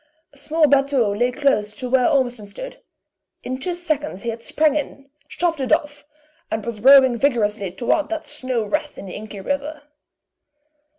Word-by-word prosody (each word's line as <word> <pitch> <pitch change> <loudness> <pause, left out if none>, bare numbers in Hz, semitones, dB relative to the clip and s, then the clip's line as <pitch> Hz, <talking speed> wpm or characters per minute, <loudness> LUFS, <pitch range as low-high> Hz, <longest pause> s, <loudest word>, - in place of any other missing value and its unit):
A - - -20
small 315 +1 +2
batteau 275 -6 +2
lay 245 +4 +1
close 245 -7 0
to 250 - -5
where 250 0 +3
Ormiston 245 -7 0
stood; - - -9 0.6
in 255 +1 -4
two 350 +6 -3
seconds 300 - -3
he 235 - -2
had 230 0 -5
sprang 305 +4 +1
in, 280 -2 -5 0.2
shoved 335 -2 -1
it 255 - -2
off, 290 0 0 0.4
and 220 -1 -3
was 230 -2 -5
rowing 260 -1 +7
vigorously 210 -8 0
toward 250 - 0
that 325 -1 -4
snow 255 -5 -3
wreath 300 +7 -3
in - - -8
the 185 - -8
inky 210 -1 -8
river. 285 +5 -3
265 Hz, 170 wpm, -21 LUFS, 230-295 Hz, 0.6 s, rowing